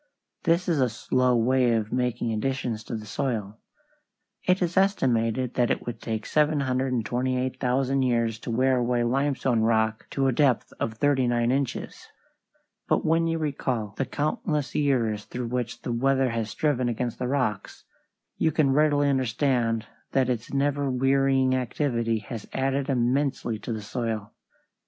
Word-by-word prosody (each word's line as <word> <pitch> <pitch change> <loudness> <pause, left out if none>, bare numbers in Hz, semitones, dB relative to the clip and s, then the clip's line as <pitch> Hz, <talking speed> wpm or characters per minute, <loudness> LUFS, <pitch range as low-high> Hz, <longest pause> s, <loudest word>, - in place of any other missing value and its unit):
This 170 +2 +2
is 165 -5 +1
a 125 - +3
slow 125 +3 +1
way 125 +1 +3
of 110 -1 -1
making 125 -2 0
additions 115 -1 -2
to 120 - -4
the 110 -1 -6
soil. 105 -2 -3 0.9
It 180 +1 +4
is 175 -1 -1
estimated 130 - +1
that 120 -1 +2
it - - -1
would 120 - -6
take 110 -1 -3
728,000 130 -2 0
years 115 -3 +1
to - - -7
wear 130 +3 +2
away 120 0 +1
limestone 130 -1 +1
rock 110 0 +1
to 135 - 0
a 135 - +3
depth 130 -1 +1
of 110 - -2
thirty 130 0 +2
nine 120 0 +1
inches. 135 -1 -3 0.8
But - - +1
when 165 +1 +3
you 165 0 0
recall 130 -8 -2
the 135 - -2
countless 150 - -2
years 115 -8 +1
through 120 -1 -5
which 120 -1 -3
the 125 - -3
weather 135 +1 +2
has 115 -1 -2
striven 130 +1 0
against 120 0 -3
the 125 - -1
rocks, 125 -7 -2 0.5
you 160 - +2
can 145 -3 +2
readily 145 0 +3
understand 125 -3 +1 0.3
that 130 -2 +2
its 120 -2 -4
never 140 0 0
wearying 135 0 +2
activity 120 -2 0
has 115 -4 -6
added 135 +1 0
immensely 125 -2 0
to 110 - -6
the 110 -2 -4
soil. 110 -2 -3
125 Hz, 150 wpm, -26 LUFS, 115-135 Hz, 0.9 s, It